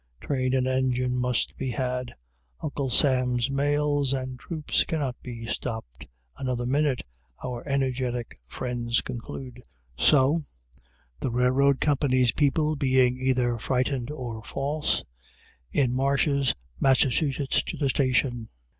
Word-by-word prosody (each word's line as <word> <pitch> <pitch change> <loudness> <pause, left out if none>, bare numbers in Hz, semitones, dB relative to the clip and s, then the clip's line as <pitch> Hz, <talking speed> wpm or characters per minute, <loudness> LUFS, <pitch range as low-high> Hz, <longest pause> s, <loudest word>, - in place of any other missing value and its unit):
Train 130 -2 0
and 130 -1 +1
engine 130 -1 +1
must 125 -1 0
be 135 - -2
had. 125 0 -2 0.4
"Uncle 140 - -3
Sam's 125 -1 +2
mails 145 0 +1
and 130 -1 -4
troops 155 +1 0
cannot 145 -7 -2
be 115 -2 -7
stopped 110 - -5 0.3
another 125 - -2
minute," 140 0 +1 0.4
our 125 -2 -4
energetic 130 -3 -1
friends 120 - -1
conclude. 125 +1 -7 0.3
So, 145 - +4 0.8
the - - -1
railroad 130 +3 +3
company's 130 -4 +3
people 150 +1 +2
being 130 -2 +3
either 125 -2 +1
frightened 130 +1 0
or 120 -7 -6
false, 145 +5 -1 0.7
in 125 -3 +2
marches 140 0 +2 0.2
Massachusetts 135 +1 +2
to - - -6
the 140 -3 +1
station. 125 -3 +1
130 Hz, 115 wpm, -26 LUFS, 125-140 Hz, 0.8 s, So